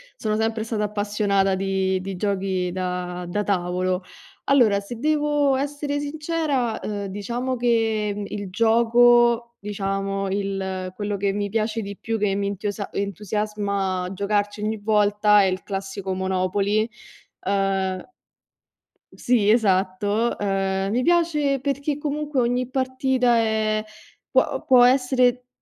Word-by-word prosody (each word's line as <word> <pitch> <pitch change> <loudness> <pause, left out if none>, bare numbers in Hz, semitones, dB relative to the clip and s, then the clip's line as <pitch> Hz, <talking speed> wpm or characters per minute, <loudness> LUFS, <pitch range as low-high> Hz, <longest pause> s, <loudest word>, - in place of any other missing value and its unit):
sono 215 -1 -1
sempre 220 0 -1
stata 220 -2 -2
appassionata 205 -2 +1
di 190 -1 0
di 190 0 -5
giochi 190 -2 -1
da 180 -1 -4
da 205 +4 -1
tavolo. 185 -1 -1 0.4
Allora, 235 -8 +4
se 215 +4 -8
devo 295 -1 +2
essere 290 +1 -2
sincera, 290 -5 -1
uhm, 205 -1 -4
diciamo 240 +6 -3
che 220 -3 0
il 200 -2 -6
gioco, 235 +2 +4
diciamo, 195 -1 -2
il 190 -2 -3
quello 205 0 -3
che 200 0 0
mi 205 0 -2
piace 220 +1 -1
di 200 -1 -7
più, 225 0 -2
che 205 -2 +1
mi 200 0 -1
entiosa 205 +1 -4
entusiasma 200 -1 -2
giocarci 205 +1 -1
ogni 215 +1 -1
volta 210 0 +3
è - - +4
il 185 0 -2
classico 195 -1 -4
Monopoly. 190 +3 0 0.6
Uhm 195 - -1 1.0
Sì, 230 -4 +1
esatto. 205 +1 +2
Ehm, 195 -1 0
mi 245 +3 +1
piace 305 -5 +2
perché 280 +1 -2
comunque 295 -1 -2
ogni 245 +1 0
partita 260 -1 +1
è 220 -1 +1 0.5
può - - +1
può 255 -5 +6
essere, 250 -1 +2
210 Hz, 125 wpm, -23 LUFS, 195-240 Hz, 1.0 s, può